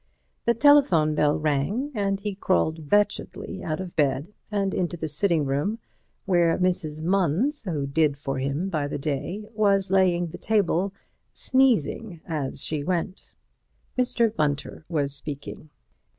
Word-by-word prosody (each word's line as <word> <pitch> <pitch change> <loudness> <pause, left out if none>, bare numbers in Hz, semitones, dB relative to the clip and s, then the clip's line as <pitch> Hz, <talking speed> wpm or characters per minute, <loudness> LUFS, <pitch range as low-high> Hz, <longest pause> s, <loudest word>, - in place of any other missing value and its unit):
The 235 - +3
telephone 230 - +5
bell 150 -1 +2
rang, 155 - -1
and 200 -3 0
he 205 0 -3
crawled 160 -5 -1
wretchedly 205 -2 0
out 155 +1 -2
of 185 -2 -6
bed 145 +4 0 0.2
and 200 -2 -1
into 175 -1 -1
the 160 - -3
sitting 160 0 +1
room, 145 +11 -1 0.5
where 175 -3 +3
Mrs. 175 -4 0
Munns, 195 - +1
who 145 -3 -1
did 145 0 +1
for 135 -2 -3
him 140 +7 -1
by 155 -6 -1
the 145 - -4
day, 150 +8 -3
was 200 -3 +2
laying 180 -2 +3
the - - -9
table, 200 -3 +1 0.4
sneezing 230 - +1
as 145 -5 -2
she 150 -2 -2
went. 180 +2 -3 0.6
Mr. 240 -3 +2
Bunter 145 0 -2
was 145 -4 0
speaking. 145 +1 -6
175 Hz, 140 wpm, -25 LUFS, 150-200 Hz, 0.6 s, telephone